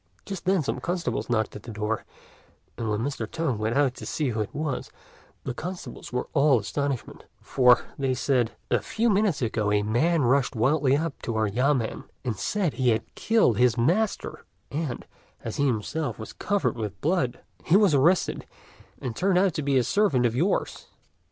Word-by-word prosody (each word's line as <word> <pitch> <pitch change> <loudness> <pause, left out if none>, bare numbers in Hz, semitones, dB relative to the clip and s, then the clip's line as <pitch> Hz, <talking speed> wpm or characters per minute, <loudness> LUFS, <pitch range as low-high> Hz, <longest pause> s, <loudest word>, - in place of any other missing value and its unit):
Just 195 -3 -6
then 185 -3 +2
some 140 - -2
constables 170 -11 -2
knocked 110 -2 0
at 105 - -7
the 120 - -11
door, 105 +1 -2 0.7
and 115 -2 -3
when 105 +1 0
Mr. 120 -4 -3
Tung 160 -9 -2
went 110 +4 0
out 140 -3 +3
to - - -9
see 150 -4 -1
who 110 -2 -2
it 105 - -3
was, 145 -4 -3 0.5
the 130 - -3
constables 175 -3 -7
were 125 0 -2
all 140 -2 +5
astonishment; 135 +4 -3
"for," 125 -2 +4 0.3
said 125 -3 +1 0.2
they, - - +3
"a - - -5
few 230 +1 0
minutes 195 -8 +1
ago 110 -2 0
a 105 0 +2
man 140 +9 +2
rushed 125 +1 +2
wildly 135 +4 +3
up 160 -1 -3
to 115 - -3
our 110 0 +2
yamên, 125 +2 0 0.2
and 120 -3 -1
said 185 - -1
he 130 -2 +1
had 110 -1 -1
killed 220 - +2
his 125 -1 +4
master; 185 - 0 0.3
and, 145 -4 -3 0.4
as 115 - -5
he 145 - +2
himself 135 +6 -2
was 110 - -8
covered 205 -1 0
with 105 -3 -5
blood, 140 -7 0 0.2
he 175 - +5
was 200 -6 +4
arrested, 165 +7 +2 0.5
and 125 -4 -4
turned 185 0 +2
out 185 -1 +3
to 155 - -2
be 140 -2 +2
a 125 - +3
servant 140 - +2
of 115 -1 +1
yours. 170 +10 -1
130 Hz, 185 wpm, -26 LUFS, 115-165 Hz, 0.7 s, all